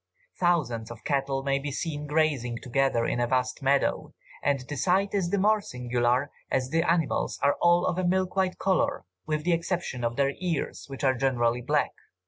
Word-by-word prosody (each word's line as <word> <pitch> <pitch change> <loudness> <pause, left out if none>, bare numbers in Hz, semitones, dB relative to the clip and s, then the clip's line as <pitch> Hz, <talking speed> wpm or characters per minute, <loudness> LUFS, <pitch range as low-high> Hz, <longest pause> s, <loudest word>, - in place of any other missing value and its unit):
Thousands 135 -11 +1
of 120 -1 -10
cattle 135 -1 0
may 140 0 +1
be 145 +1 -4
seen 150 +1 -4
grazing 145 -6 +1
together 130 -2 +1
in 120 - -1
a 120 - +1
vast 125 0 0
meadow, 135 +1 +1 0.3
and 145 -1 +1
the 135 +4 -6
sight 195 +5 +1
is 190 -4 0
the 200 - +1
more 210 +2 +3
singular 125 -1 0 0.2
as 130 0 -1
the 165 +1 +3
animals 165 -2 0
are 140 0 +4
all 175 0 +4
of 175 - 0
a - - 0
milk 185 +1 +1
white 190 -1 +1
colour, 190 -1 0 0.2
with 155 -1 -1
the 175 +1 +2
exception 170 -7 -2
of 120 0 -1
their 140 +1 +1
ears, 170 -5 -2
which 135 0 -7
are 130 -1 +4
generally 125 -2 +1
black. - - +1
140 Hz, 190 wpm, -27 LUFS, 125-175 Hz, 0.3 s, are